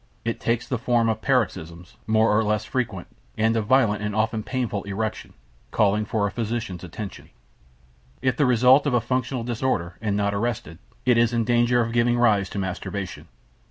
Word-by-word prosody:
It 115 Hz, -, -2 dB
takes 115 Hz, 0 st, -1 dB
the 125 Hz, -, -2 dB
form 120 Hz, -1 st, +2 dB
of 110 Hz, -1 st, -2 dB
paroxysms, 90 Hz, -, -1 dB
more 110 Hz, -1 st, +3 dB
or 110 Hz, -, +3 dB
less 105 Hz, 0 st, 0 dB
frequent, 110 Hz, -9 st, -3 dB, 0.3 s
and 110 Hz, +1 st, +2 dB
of 110 Hz, -2 st, -1 dB
violent 115 Hz, -6 st, +3 dB
and 105 Hz, 0 st, -3 dB
often 110 Hz, 0 st, 0 dB
painful 120 Hz, -4 st, -3 dB
erection, 105 Hz, +2 st, -4 dB, 0.4 s
calling 105 Hz, +1 st, +2 dB
for 110 Hz, -3 st, 0 dB
a 100 Hz, -, -1 dB
physician's 115 Hz, -6 st, -4 dB
attention. 95 Hz, +4 st, -8 dB, 0.9 s
If 130 Hz, 0 st, +1 dB
the 145 Hz, -, +2 dB
result 125 Hz, +4 st, +5 dB
of 130 Hz, -, +2 dB
a -, -, +4 dB
functional 125 Hz, +1 st, -2 dB
disorder, 115 Hz, -8 st, -2 dB
and 105 Hz, -2 st, 0 dB
not 100 Hz, 0 st, 0 dB
arrested, 105 Hz, -6 st, -3 dB, 0.3 s
it 125 Hz, -2 st, +4 dB
is 120 Hz, 0 st, +3 dB
in 115 Hz, -1 st, +1 dB
danger 120 Hz, +1 st, +3 dB
of 115 Hz, 0 st, -2 dB
giving 120 Hz, 0 st, +2 dB
rise 105 Hz, -5 st, +3 dB
to -, -, -7 dB
masturbation. 95 Hz, 0 st, -4 dB
110 Hz, 180 wpm, -24 LUFS, 105-120 Hz, 0.9 s, result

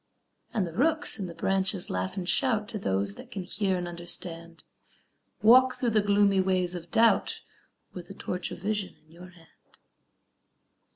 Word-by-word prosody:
And 210 Hz, -5 st, -1 dB
the 165 Hz, -, -8 dB
rooks 310 Hz, -, +4 dB
in 190 Hz, -, -4 dB
the 170 Hz, -, -10 dB
branches 190 Hz, +1 st, 0 dB
laugh 95 Hz, -, -4 dB
and 180 Hz, -2 st, -4 dB
shout 220 Hz, -2 st, +2 dB
To 215 Hz, -, -5 dB
those 100 Hz, -, -1 dB
that -, -, -13 dB
can 195 Hz, -, -6 dB
hear 190 Hz, 0 st, -1 dB
and 175 Hz, 0 st, -4 dB
understand; 170 Hz, -1 st, -6 dB, 0.8 s
"Walk 255 Hz, +3 st, +6 dB
through 240 Hz, -2 st, -1 dB
the 215 Hz, -1 st, +3 dB
gloomy 200 Hz, -1 st, +2 dB
ways 185 Hz, -1 st, 0 dB
of 175 Hz, -1 st, -8 dB
doubt 230 Hz, +4 st, +2 dB, 0.5 s
With 175 Hz, -1 st, -9 dB
the 195 Hz, -, -11 dB
torch 180 Hz, -1 st, -5 dB
of -, -, -8 dB
vision 205 Hz, +1 st, -3 dB
in 155 Hz, +1 st, -28 dB
your 175 Hz, +2 st, -13 dB
hand." 170 Hz, -2 st, -20 dB
185 Hz, 170 wpm, -27 LUFS, 170-210 Hz, 0.8 s, Walk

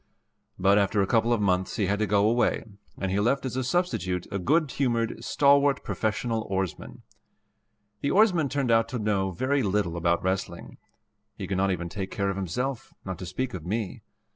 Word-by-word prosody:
But 100 Hz, +2 st, +4 dB
after 100 Hz, 0 st, +2 dB
a -, -, +1 dB
couple 115 Hz, +3 st, +2 dB
of 120 Hz, -, +2 dB
months 95 Hz, -2 st, +1 dB
he 105 Hz, -, +1 dB
had 100 Hz, +2 st, 0 dB
to 110 Hz, -, +1 dB
go 100 Hz, 0 st, +3 dB
away, 120 Hz, +2 st, +1 dB, 0.3 s
and 95 Hz, -1 st, -2 dB
he 100 Hz, -, +1 dB
left 125 Hz, +6 st, +1 dB
as 125 Hz, -, -3 dB
a 130 Hz, -, -1 dB
substitute 105 Hz, -, -1 dB
a 100 Hz, -, -2 dB
good 150 Hz, -, +2 dB
humored, 120 Hz, -4 st, -1 dB
stalwart 140 Hz, 0 st, +3 dB
professional 110 Hz, +1 st, -1 dB
oarsman. 95 Hz, -3 st, -4 dB, 1.0 s
The 140 Hz, -, 0 dB
oarsman 180 Hz, -5 st, +3 dB
turned 135 Hz, -3 st, 0 dB
out 115 Hz, 0 st, +3 dB
to 125 Hz, -, -3 dB
know 105 Hz, -3 st, 0 dB
very 130 Hz, +10 st, 0 dB
little 100 Hz, -5 st, 0 dB
about 85 Hz, 0 st, +1 dB
wrestling. 95 Hz, -2 st, -3 dB, 0.6 s
He -, -, -4 dB
could 95 Hz, -, -2 dB
not 95 Hz, +1 st, +2 dB
even 90 Hz, -2 st, -2 dB
take 95 Hz, +2 st, -5 dB
care 100 Hz, 0 st, -1 dB
of -, -, -5 dB
himself, 125 Hz, +8 st, -3 dB
not 95 Hz, -3 st, -5 dB
to 90 Hz, -, -6 dB
speak 125 Hz, +8 st, -3 dB
of 85 Hz, -, -6 dB
me. 110 Hz, +3 st, -3 dB
105 Hz, 190 wpm, -27 LUFS, 95-130 Hz, 1.0 s, But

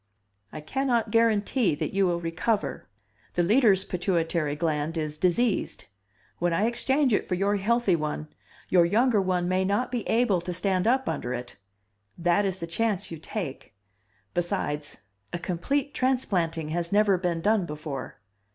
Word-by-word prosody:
"I 155 Hz, -, -7 dB
can 265 Hz, -, -2 dB
not 235 Hz, -4 st, +1 dB
guarantee 225 Hz, -, +2 dB
that -, -, -3 dB
you 195 Hz, -1 st, +3 dB
will 170 Hz, -1 st, 0 dB
recover. 175 Hz, +6 st, -2 dB, 0.5 s
The 175 Hz, -, +2 dB
Leader's 205 Hz, -1 st, +4 dB
pituitary 170 Hz, -4 st, 0 dB
gland 155 Hz, 0 st, -1 dB
is 155 Hz, -1 st, -2 dB
diseased; 185 Hz, +7 st, 0 dB, 0.5 s
when 175 Hz, 0 st, +1 dB
I 200 Hz, +6 st, +2 dB
exchange 265 Hz, +3 st, +2 dB
it -, -, +1 dB
for 180 Hz, -, 0 dB
your 200 Hz, +3 st, +1 dB
healthy 215 Hz, -1 st, +2 dB
one 155 Hz, -1 st, -3 dB, 0.4 s
your 180 Hz, -2 st, +5 dB
younger 215 Hz, +5 st, +3 dB
one 180 Hz, -2 st, 0 dB
may 185 Hz, +1 st, +1 dB
not 205 Hz, +7 st, 0 dB
be 245 Hz, -2 st, -1 dB
able 225 Hz, -6 st, +2 dB
to 180 Hz, +1 st, -4 dB
stand 185 Hz, +2 st, 0 dB
up 260 Hz, +2 st, +2 dB
under 125 Hz, +1 st, -2 dB
it 120 Hz, 0 st, -7 dB, 0.6 s
that 175 Hz, +3 st, +2 dB
is 190 Hz, -1 st, -1 dB
the 170 Hz, -, -3 dB
chance 205 Hz, +2 st, -1 dB
you 165 Hz, -, -6 dB
take. 155 Hz, -, -6 dB, 0.6 s
Besides 160 Hz, -5 st, -2 dB, 0.4 s
a -, -, 0 dB
complete 250 Hz, +12 st, -2 dB
transplanting 180 Hz, -12 st, 0 dB
has 170 Hz, +1 st, -1 dB
never 205 Hz, -1 st, +4 dB
been 175 Hz, -2 st, -1 dB
done 205 Hz, 0 st, +2 dB
before." 150 Hz, -3 st, -6 dB
185 Hz, 160 wpm, -26 LUFS, 165-220 Hz, 0.6 s, your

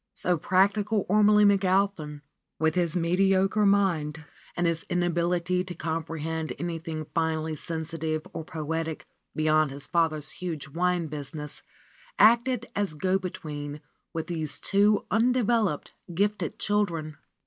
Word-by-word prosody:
So 180 Hz, -, +1 dB
practi 195 Hz, +5 st, +2 dB
cal 210 Hz, -1 st, 0 dB
Ormelie 210 Hz, +1 st, +5 dB
McAlpin, 190 Hz, -6 st, +2 dB, 0.4 s
with 160 Hz, 0 st, +2 dB
his 175 Hz, -1 st, 0 dB
mediocre 190 Hz, +4 st, +3 dB
mind 160 Hz, -6 st, +1 dB, 0.3 s
and 175 Hz, -, +1 dB
his 165 Hz, -1 st, +1 dB
inability 175 Hz, 0 st, +1 dB
to 180 Hz, -1 st, -7 dB
comprehend 160 Hz, 0 st, -3 dB
anything 165 Hz, -2 st, -4 dB
finely 160 Hz, -1 st, 0 dB
sensitive 160 Hz, 0 st, -3 dB
or -, -, -4 dB
poetic 160 Hz, 0 st, -4 dB, 0.3 s
beyond 155 Hz, -1 st, +3 dB
his 140 Hz, +1 st, -6 dB
father's 155 Hz, -4 st, 0 dB
huge 165 Hz, -2 st, -5 dB
wine 175 Hz, +2 st, 0 dB
business, 150 Hz, 0 st, -5 dB, 0.6 s
acted 235 Hz, +2 st, +4 dB
as 200 Hz, -6 st, -1 dB
go 185 Hz, +5 st, +1 dB
between 150 Hz, -5 st, -6 dB, 0.3 s
with 160 Hz, -1 st, -3 dB
these 160 Hz, -4 st, -2 dB
two 205 Hz, +1 st, +3 dB
undeveloped, 225 Hz, -, +1 dB, 0.2 s
gifted 205 Hz, +4 st, -1 dB
children. 170 Hz, -8 st, -1 dB
170 Hz, 120 wpm, -27 LUFS, 155-195 Hz, 0.6 s, Ormelie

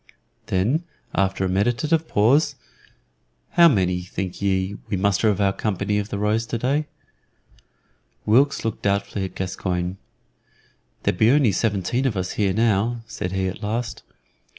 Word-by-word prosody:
Then, 115 Hz, -, +1 dB, 0.3 s
after 95 Hz, 0 st, +1 dB
a -, -, +1 dB
meditative 120 Hz, -, +1 dB
pause, 125 Hz, +10 st, +3 dB, 1.0 s
"How 170 Hz, -1 st, +7 dB
many, 90 Hz, -, +2 dB
think 90 Hz, +1 st, -5 dB
ye, 95 Hz, 0 st, 0 dB
we 100 Hz, -, 0 dB
muster 100 Hz, +3 st, +2 dB
of 100 Hz, -, 0 dB
our 100 Hz, -1 st, +2 dB
company 105 Hz, 0 st, -1 dB
of 105 Hz, +1 st, -4 dB
the 100 Hz, -, -3 dB
Rose 105 Hz, +2 st, 0 dB
today?" 135 Hz, +7 st, -1 dB, 1.4 s
Wilkes 135 Hz, +4 st, +3 dB
looked 115 Hz, -, -2 dB
doubtfully 100 Hz, 0 st, -1 dB
at 95 Hz, -, -8 dB
Gascoyne. 90 Hz, -1 st, -3 dB, 1.1 s
"There -, -, +2 dB
be 110 Hz, +5 st, +3 dB
only 135 Hz, -4 st, +4 dB
seventeen 110 Hz, +6 st, 0 dB
of 110 Hz, -6 st, -2 dB
us 95 Hz, -1 st, -2 dB
here 100 Hz, -3 st, +1 dB
now," 115 Hz, +2 st, +1 dB
said 90 Hz, -4 st, -5 dB
he 95 Hz, 0 st, 0 dB
at 95 Hz, +3 st, -6 dB
last. 115 Hz, +3 st, -3 dB
105 Hz, 145 wpm, -23 LUFS, 95-115 Hz, 1.4 s, How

